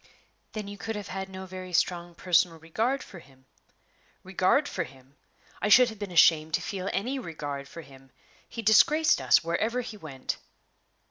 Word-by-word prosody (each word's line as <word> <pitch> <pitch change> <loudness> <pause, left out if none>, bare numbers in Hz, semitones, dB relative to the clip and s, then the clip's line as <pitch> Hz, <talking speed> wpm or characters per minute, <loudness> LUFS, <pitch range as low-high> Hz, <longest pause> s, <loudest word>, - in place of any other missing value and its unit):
"Then 215 -2 -5
you 205 0 -9
could 225 0 -4
have 205 -1 -6
had 190 0 -5
no 190 0 -8
very 185 -1 -8
strong 175 0 0
personal 175 -1 +2
regard 220 - -2
for 190 - -12
him?" 135 -4 -21 0.8
"Regard 190 +10 +2
for - - -2
him! 135 0 -16 0.5
I 210 - 0
should 245 +3 +7
have 220 -2 -10
been 205 -2 -5
ashamed 160 -2 +5
to - - -2
feel 195 -1 -4
any 260 +7 -2
regard 145 - -6
for 165 - -10
him. 135 -2 -17 0.4
He 230 - -6
disgraced 220 - +5
us 130 +4 +4
wherever 220 +9 -1
he 225 -3 -8
went." 140 -8 -5
185 Hz, 175 wpm, -27 LUFS, 160-215 Hz, 0.8 s, should